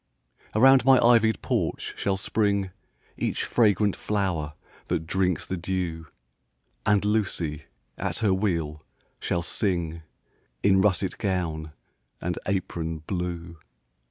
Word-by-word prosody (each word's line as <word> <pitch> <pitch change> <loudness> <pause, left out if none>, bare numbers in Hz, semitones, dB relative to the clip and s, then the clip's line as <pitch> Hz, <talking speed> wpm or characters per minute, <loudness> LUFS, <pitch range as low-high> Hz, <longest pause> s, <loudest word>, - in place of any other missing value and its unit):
Around 130 +2 +7
my 135 0 +7
ivy'd 115 -3 +4
porch - - -1
shall 95 -1 0
spring 100 -1 0 0.5
Each - - -1
fragrant 105 -3 +3
flower 90 -8 -2 0.3
that 80 - -1
drinks 90 -1 0
the 95 - -3
dew; 85 -2 -3 0.8
And 105 -2 +3
Lucy, 95 -8 -1 0.3
at - - -2
her 105 -4 +2
wheel, 85 -6 -1 0.4
shall 85 - -1
sing 85 -4 -1 0.6
In 95 -1 +5
russet 95 -1 +1
gown 80 -6 -2 0.5
and 90 0 -3
apron 80 -4 -2
blue. 85 -2 -4
95 Hz, 110 wpm, -26 LUFS, 85-105 Hz, 0.8 s, Around